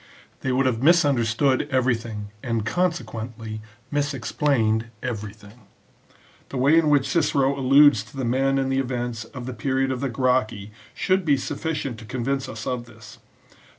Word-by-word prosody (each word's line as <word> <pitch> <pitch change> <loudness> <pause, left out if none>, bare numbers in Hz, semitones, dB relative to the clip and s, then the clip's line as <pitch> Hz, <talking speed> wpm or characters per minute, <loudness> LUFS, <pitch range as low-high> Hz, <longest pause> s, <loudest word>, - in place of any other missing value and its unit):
They 130 - -2
would 130 +1 +2
have 120 -3 0
misunderstood 140 -4 +3
every 130 -2 +2
thing, 110 -3 -6
and 115 -3 -2
consequently 115 -9 -3 0.3
misexplained 135 -5 0 0.2
everything. 105 -1 -7 0.8
The 135 - -5
way 140 +6 +5
in 155 -2 +2
which 140 -2 +3
Cicero 140 -3 +2
alludes 135 -2 +6
to - - -14
the 130 - -2
men 135 +3 +1
and 135 0 0
events 120 -3 -2
of 120 +1 -9
the 130 - -5
period 130 +3 0
of 130 - -2
the 140 - -1
Gracchi 115 -4 0 0.2
should 185 0 +1
be 150 -4 +3
suffi 160 +4 -3
cient 135 -5 -4
to 115 - -11
convince 130 +3 -2
us 110 -1 -7
of 125 -2 -3
this. 115 -3 -14
130 Hz, 155 wpm, -24 LUFS, 115-140 Hz, 0.8 s, alludes